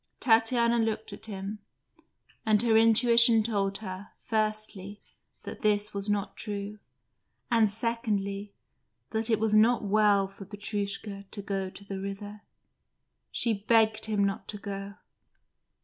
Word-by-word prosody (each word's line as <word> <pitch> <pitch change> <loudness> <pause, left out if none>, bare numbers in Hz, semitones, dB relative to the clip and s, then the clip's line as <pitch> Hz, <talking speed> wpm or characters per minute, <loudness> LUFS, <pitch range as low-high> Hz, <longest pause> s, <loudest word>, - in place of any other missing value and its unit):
Tatiana 235 0 +3
looked 220 -1 -2
at - - -8
him, 200 0 -6 0.8
and 215 -1 +3
her 230 -2 +3
intuition 230 0 +6
told 200 -3 -1
her, 185 +2 -7
firstly, 215 -3 -2 0.4
that - - -7
this 210 -1 +1
was 200 +1 -2
not 205 -1 -1
true, 205 -1 -6 0.7
and, 225 -3 +4
secondly, 205 -3 -2 0.6
that 220 +1 0
it 220 -2 +2
was 220 -1 +1
not 225 +2 +4
well 205 -1 +3
for 195 +1 -12
Petrushka 205 0 -4
to 205 - -6
go 195 -1 -3
to 200 +2 -12
the 195 -1 -5
river. 205 +2 -7 0.9
She 230 - +1
begged 220 +1 +2
him 210 -2 0
not 200 +2 -2
to 210 - -6
go. 200 0 -6
210 Hz, 135 wpm, -28 LUFS, 200-220 Hz, 0.9 s, intuition